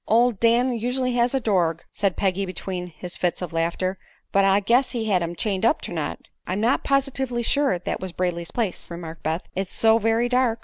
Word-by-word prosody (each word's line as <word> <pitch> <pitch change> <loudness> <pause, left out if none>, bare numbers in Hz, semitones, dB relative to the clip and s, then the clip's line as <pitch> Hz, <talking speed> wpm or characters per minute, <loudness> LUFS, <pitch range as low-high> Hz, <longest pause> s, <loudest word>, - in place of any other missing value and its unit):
"Ol' 235 +3 +4
Dan 235 +4 +3
usu'lly 250 +2 0
has 245 +2 +2
a - - +3
dorg," 175 -8 +1
said 200 -3 0
Peggy, 195 0 +1
between 185 -1 -4
his 175 +1 -6
fits 175 -1 -1
of 180 -3 -5
laughter; 170 +3 -1 0.3
"but 195 - +4
I 195 0 +5
guess 245 +6 +3
he 230 -3 -3
had 195 -4 +2
him 170 0 -3
chained 195 0 -2
up 230 +7 +3
ternight." - - -5 0.2
"I'm 185 +2 -1
not 235 +5 +2
positively 265 -3 0
sure 280 -6 +2
that 175 - -3
was 185 -1 -5
Brayley's 170 -1 -2
place," 220 -6 -3
remarked 170 -1 -7
Beth; 160 +3 -2
"it's 190 0 -2
so 225 0 +4
very 225 +2 +2
dark." 250 -2 +2
200 Hz, 205 wpm, -24 LUFS, 180-240 Hz, 0.3 s, I